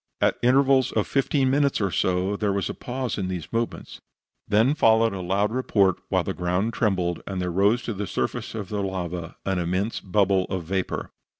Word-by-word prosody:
At - - +2
intervals 130 +1 +4
of 110 - +1
fifteen 135 -1 +1
minutes 140 0 +2
or 100 -3 0
so, 95 +3 0
there 105 0 0
was 100 0 -1
a - - -7
pause 125 -2 -4
in 95 - -2
these 90 +1 -5
movements. 115 0 -3 0.5
Then 110 +6 +3
followed 115 -5 +4
a 95 - -4
loud 100 +4 0
report, 100 -7 +2
while - - +2
the - - -3
ground 90 +6 -1
trembled, 90 -6 0
and 95 -2 -3
there 90 -1 -2
rose 100 +7 +2
to 115 - -3
the 100 0 -4
surface - - -3
of 105 -4 -5
the 105 -1 -2
lava 90 -3 -4
an 95 -2 0
immense 90 +6 -1
bubble 95 -1 +2
of 95 -3 -4
vapor. 95 +2 -3
100 Hz, 195 wpm, -25 LUFS, 95-115 Hz, 0.5 s, intervals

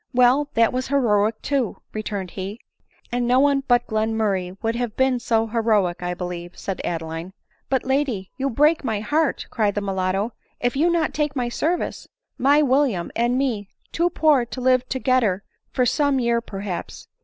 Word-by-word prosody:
" - - -47
Well, 255 +4 +4
that 230 +1 +4
was 255 0 -2
heroic 220 -5 +2
too," 275 -6 0 0.2
returned 205 -4 -4
he. 195 +3 -6 0.3
" - - -34
And 240 0 0
no 250 +1 +4
one 280 0 +3
but 245 -1 +3
Glenmurray 215 -4 -1
would 225 +1 0
have 235 -3 -3
been 260 -1 +2
so 225 -1 +1
he 225 +1 -9
roic, 210 -7 +2
I 180 0 -2
believe," 175 -1 -6
said 195 -2 -4
Adeline. 165 +2 -4 0.2
" - - -41
But, 265 -1 0
lady, 265 -8 -1
you 275 +1 -1
break 300 +6 +3
my 220 -5 -1
heart," 305 +5 0
cried 210 -3 +1
the 205 - 0
mulatto, 195 +2 -1
" - - -43
if 245 +1 0
you 315 +5 +3
not 335 -2 +1
take 295 -1 -1
my 245 -2 -1
service. 330 +8 -2 0.3
My 285 +4 +5
William 260 -10 +1
and 240 +2 +1
me, 235 -7 -1 0.2
too 345 +1 +1
poor 305 -6 +3
to 240 +2 -7
live 255 0 +2
togedder 255 -7 +1 0.4
of 250 -1 +4
some 285 +1 +2
year 235 -1 +1
perhaps. 195 -4 -6
240 Hz, 190 wpm, -23 LUFS, 205-270 Hz, 0.4 s, My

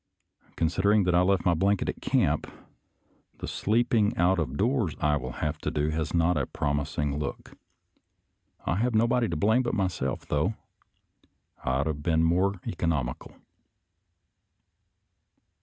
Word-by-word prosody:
Consid 85 +3 0
ering 100 -1 +4
that 90 - +2
I 90 - +5
left 95 0 +2
my 90 - +4
blanket 100 +4 +1
at - - -4
camp, - - +1 0.9
the - - -6
sleep 115 +4 0
ing 105 -2 +2
out 90 +2 +3
of 70 -4 -2
doors 115 - +1
I 75 -1 +2
will 65 -3 -4
have 75 +1 -2
to - - -2
do 75 +1 -1
has 80 0 -2
not 85 0 +2
a 70 - -1
prom 75 0 -1
ising 75 -1 -2
look. 70 -2 -6 1.1
I 85 - 0
have 120 +2 0
nobody 115 +1 +3
to 85 - -2
blame 110 +10 +3
but 120 - -2
myself, 90 -9 -2
though 75 +9 0 0.5
— - - -34
I - - -1
ought 65 +2 +1
to 80 - -1
have 75 -1 -7
been 80 +1 +2
more 90 +4 +2
economical. 80 -8 -2
85 Hz, 160 wpm, -27 LUFS, 75-100 Hz, 1.1 s, I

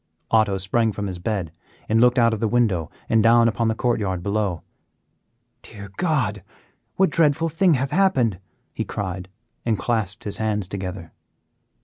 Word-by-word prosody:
Otto 110 -3 +3
sprang 110 +4 +1
from 105 0 -4
his 95 -3 -5
bed 90 -4 -2 0.4
and 110 +1 +3
looked 125 +1 +4
out 115 -1 +4
of 110 - -3
the 115 - +1
window 105 -9 +1 0.2
and 115 - +3
down 115 +1 +5
upon 115 +1 0
the 110 - +1
court 120 -1 0
yard 95 -4 -2
below. 100 -4 -1 1.0
"Dear 100 -2 -11
God! 125 - 0 0.5
what 190 0 +3
dreadful 165 0 +2
thing 165 +1 +3
hath 130 +1 -2
happened?" 130 - +2 0.3
he - - -2
cried 95 -2 -5 0.3
and 115 -3 0
clasped 110 -5 -1
his 105 - -5
hands 105 -3 -1
together. 95 -3 -6
110 Hz, 160 wpm, -23 LUFS, 100-120 Hz, 1.0 s, down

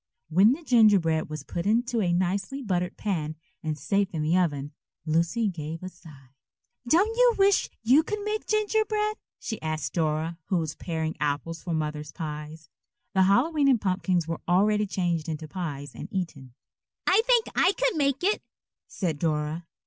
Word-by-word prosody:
When 195 +9 +5
the 330 +5 -7
gingerbread 200 - +4
was 155 -2 -6
put 170 +5 -4
into 235 +2 +1
a 180 -3 +1
nicely 195 +10 -1
buttered 180 -4 -1
pan 155 -7 -2 0.3
and 155 -1 -3
safe 200 +7 +1
in 155 - -1
the 160 +3 +2
oven, 145 -6 0 0.3
Lucy 170 +8 +1
gave 165 -2 -5
a 185 - -4
sigh. 155 -7 -16 0.6
"Don't 390 - +3
you - - +5
wish 395 0 +3
you 255 +7 +6
could 420 +6 -3
make 425 +1 -3
gingerbread?" 430 0 +1 0.2
she 220 -3 -5
asked 155 -4 -3
Dora, 160 0 -1
who 185 - 0
was 160 -2 -2
paring 160 -2 -3
apples 150 +3 -2
for 170 -2 -2
Mother's 150 -1 -3
pies. 150 0 -7 0.5
The 190 -1 +4
Hallowe'en 275 +4 +4
pumpkins 185 -4 0
were 165 - -4
already 210 +4 +3
changed 175 -4 -1
into 155 0 -4
pies 145 -6 -5
and - - -7
eaten. 145 -9 -5 0.5
"I 385 +4 +5
think 480 -3 +5
I 380 - +4
could - - 0
make 280 -1 +1
it," 410 +3 +2 0.5
said 165 -7 -3
Dora. 155 +1 -1
175 Hz, 165 wpm, -27 LUFS, 155-240 Hz, 0.6 s, you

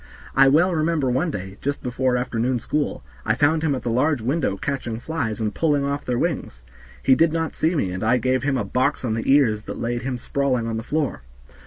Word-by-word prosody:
I 135 0 +7
well 170 +7 +4
remember 155 -4 +1
one 135 +8 +1
day, 95 -6 -6
just 140 +1 -3
before 125 0 0
afternoon 125 0 0
school, 145 - -2 0.2
I 110 - +1
found 150 +4 +2
him 155 -3 +1
at 130 - -5
the 120 - -1
large 140 +4 +2
window 125 -3 -1
catching 120 -3 -3
flies 125 -7 -3
and 110 -2 -1
pulling 145 -3 +1
off 140 +1 -2
their 125 -1 -1
wings. - - -2 0.4
He 135 - +5
did 165 +4 +4
not 165 -1 -2
see 165 +3 +1
me 95 - 0
and 90 +3 -4
I 120 +3 +3
gave 130 0 +1
him 135 -1 0
a - - 0
box 130 0 0
on 110 - 0
the 115 +4 0
ears 120 -7 +4
that - - -7
laid 120 +1 -2
him 130 -1 -3
sprawling 130 -1 -1
on 115 -1 -2
the - - -3
floor. 145 - -2
130 Hz, 225 wpm, -23 LUFS, 115-145 Hz, 0.4 s, I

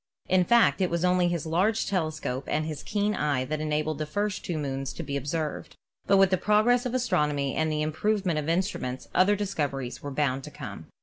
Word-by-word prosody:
In 185 -1 +3
fact, 235 -2 +4
it 185 - +2
was 170 +1 0
only 180 0 +3
his 170 -3 -2
large 185 +8 +1
telescope 155 -7 -2
and 155 +1 0
his 155 -2 -5
keen 210 0 0
eye 145 -8 0
that 155 +3 -3
enabled 155 0 -1
the 155 - -2
first 205 +5 -2
two 170 - -3
moons 135 -2 -3
to - - -6
be 140 - -4
observed. 150 +3 -3 0.3
But 195 - +5
with 195 -1 +5
the 185 - +3
progress 235 +6 +3
of 250 - -3
astronomy 150 - +1
and 160 0 +1
the 150 0 0
improvement 180 +2 0
of 150 +1 -3
instruments 165 -8 -2
other 200 +3 +4
discoveries 145 -11 -3
were 145 - -5
bound 135 -1 0
to - - -7
come. - - -8
160 Hz, 205 wpm, -27 LUFS, 145-195 Hz, 0.3 s, But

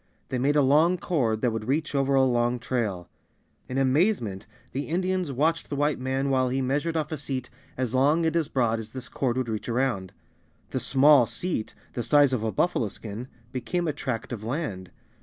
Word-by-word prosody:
They 130 -2 -1
made 140 +4 +2
a 145 - +5
long 155 +7 +4
cord 120 -11 0
that 125 - +2
would 110 0 -4
reach 150 +4 0
over 135 0 +2
a 135 - +5
long 120 -1 +1
trail. 110 -7 -2 0.6
In 130 - -3
amazement 135 - +1 0.2
the 140 +2 -3
Indians 185 -1 -1
watched 160 +5 0
the 145 - -2
White 145 0 +1
man 135 +2 -1
while 130 -1 +2
he 130 +2 0
measured 145 +5 0
off 155 -1 -2
a 155 - -3
seat 130 -3 -4 0.3
as 125 -2 -1
long 145 +6 +3
and 160 0 +1
as 165 -3 +1
broad 120 -6 +1
as 110 0 -8
this 130 -1 -7
cord 130 -2 -1
would 130 -2 -1
reach 110 +1 -4
around. 115 -6 0 0.6
The - - -1
"small 135 -2 +5
seat," 175 -9 -3 0.2
the 120 - -2
size 145 +1 +4
of 125 - 0
a 110 - 0
buffalo 120 - +1
skin, 110 +4 -7 0.2
became 170 +7 -2
a 155 - 0
tract 125 -5 -4
of 110 -3 -6
land. 110 - -3
130 Hz, 200 wpm, -26 LUFS, 120-150 Hz, 0.6 s, a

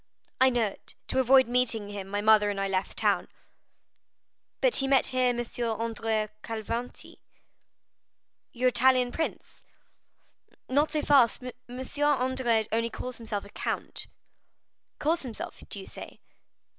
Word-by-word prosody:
"I 260 - +6
know 240 -3 +1
it; 200 - -8
to 265 - +1
avoid 260 0 +6
meeting 235 -4 +1
him, 200 -2 -6
my 205 +1 -2
mother 210 -1 +5
and 200 -1 -3
I 195 - 0
left 190 0 -2
town." - - +2 1.3
"But - - +3
he 270 - +1
met 270 -1 +4
here 255 0 +3
M. 240 -1 -1 0.4
Andrea 225 -2 -1
Cavalcanti." 230 +2 -5 1.3
"Your 255 +1 +2
Italian 255 -1 +3
prince?" 320 - -5 1.0
"Not 290 +4 +2
so 305 -1 -1
fast; 265 -3 +4
M. 250 0 -9 0.2
Andrea 260 -5 +2
only 230 +1 +1
calls 250 +1 -6
himself 215 -3 -4
count." - - -4 0.9
"Calls 330 +3 +1
himself, 240 -5 -6
do 200 - -5
you 190 - -9
say?" - - -10
245 Hz, 130 wpm, -28 LUFS, 220-260 Hz, 1.3 s, I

